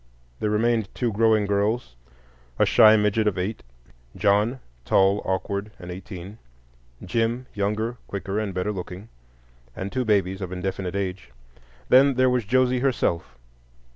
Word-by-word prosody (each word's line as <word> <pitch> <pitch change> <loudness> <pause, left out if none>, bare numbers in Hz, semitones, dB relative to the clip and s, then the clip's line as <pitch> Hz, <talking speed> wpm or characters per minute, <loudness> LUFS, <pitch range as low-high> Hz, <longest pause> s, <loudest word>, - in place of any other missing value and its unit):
There 105 - 0
remained 110 -1 +1
two 120 -2 0
growing 110 0 +3
girls; 100 - -1 0.6
a - - +4
shy 110 0 +7
midget 105 +1 +1
of 100 - 0
eight; 95 +4 -3 0.5
John, 105 +5 +2 0.2
tall, 95 +8 +3
awkward, 100 +2 -2
and 90 -1 -9
eighteen; 95 +3 -9 0.7
Jim, 120 +2 -1
younger, 105 +4 -2
quicker, 100 +1 -3
and 105 -2 -2
better 95 +3 -2
looking; 95 +2 -7 0.7
and 95 +1 -5
two 130 - -1
babies 100 -3 +1
of 95 -2 -5
indefinite 95 0 -4
age. 95 -7 -3 0.6
Then 135 +1 +6
there 130 0 +3
was 125 -3 0
Josie 130 +2 +2
herself. 85 - -1
105 Hz, 140 wpm, -24 LUFS, 95-115 Hz, 0.7 s, shy